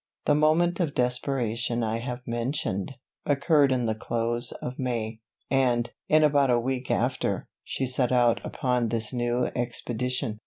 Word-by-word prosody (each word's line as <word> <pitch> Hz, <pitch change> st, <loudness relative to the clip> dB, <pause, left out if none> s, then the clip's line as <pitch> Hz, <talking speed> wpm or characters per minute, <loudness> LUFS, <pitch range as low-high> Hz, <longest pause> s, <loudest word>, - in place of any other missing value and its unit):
The 150 Hz, -, +4 dB
moment 160 Hz, +4 st, +3 dB
of 160 Hz, -6 st, -1 dB
desperation 125 Hz, -2 st, 0 dB
I 110 Hz, +1 st, -1 dB
have 125 Hz, +1 st, -5 dB
mentioned, 120 Hz, -2 st, -2 dB, 0.3 s
occurred 145 Hz, 0 st, +3 dB
in 125 Hz, -2 st, +1 dB
the 110 Hz, -, +1 dB
close 120 Hz, +2 st, -1 dB
of 125 Hz, +1 st, -7 dB
May, 115 Hz, -4 st, -2 dB, 0.3 s
and, 125 Hz, -3 st, +2 dB, 0.2 s
in 155 Hz, 0 st, +5 dB
about 140 Hz, -2 st, +4 dB
a 120 Hz, -1 st, +4 dB
week 125 Hz, +1 st, -3 dB
after, -, -, 0 dB, 0.2 s
she 135 Hz, -, -2 dB
set 125 Hz, -1 st, +1 dB
out 120 Hz, -2 st, +3 dB
upon 125 Hz, -2 st, 0 dB
this 110 Hz, +1 st, -1 dB
new 120 Hz, 0 st, 0 dB
expedition. 120 Hz, -2 st, -2 dB
125 Hz, 150 wpm, -26 LUFS, 120-135 Hz, 0.3 s, in